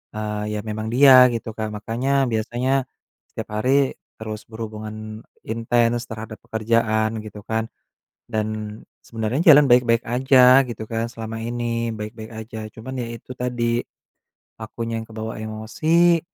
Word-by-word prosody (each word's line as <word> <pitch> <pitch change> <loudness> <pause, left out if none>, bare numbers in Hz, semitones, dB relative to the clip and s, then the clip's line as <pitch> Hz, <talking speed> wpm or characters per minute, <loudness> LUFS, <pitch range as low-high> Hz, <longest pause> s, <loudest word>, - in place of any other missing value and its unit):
eee, 105 0 -3
ya - - -2
memang 110 0 -4
dia, 130 -1 +8
gitu 115 -1 -4
kan. 110 -1 -2
Makanya 115 +5 -2 0.2
biasanya, 125 +4 0 0.4
setiap - - -7
hari 135 +3 +2 0.2
terus 110 -1 -7
berhubungan 110 -1 -7 0.5
intens, 115 +1 0
terhadap 110 -1 -8
pekerjaan 110 0 +1
gitu 105 -1 -10
kan. 110 +1 -2 0.6
Dan, 110 -1 -3 0.2
sebenernya 115 +4 -3
jalan 145 +1 +7
baik-baik 120 -1 +4
aja, 130 +1 +6
gitu 115 -2 -6
kan. 115 +1 -3
Selama 115 -1 -6
ini, 115 0 -2
baik-baik 110 +1 -7
aja. 110 0 -7 0.2
Cuman 130 +3 -6
ya 120 - -4
itu 120 - -11
tadi, 120 -1 -1 0.8
akunya 115 +1 -4
yang 110 - -11
kebawa 110 0 -5
emosi. 155 +11 +2
115 Hz, 130 wpm, -22 LUFS, 110-120 Hz, 0.8 s, dia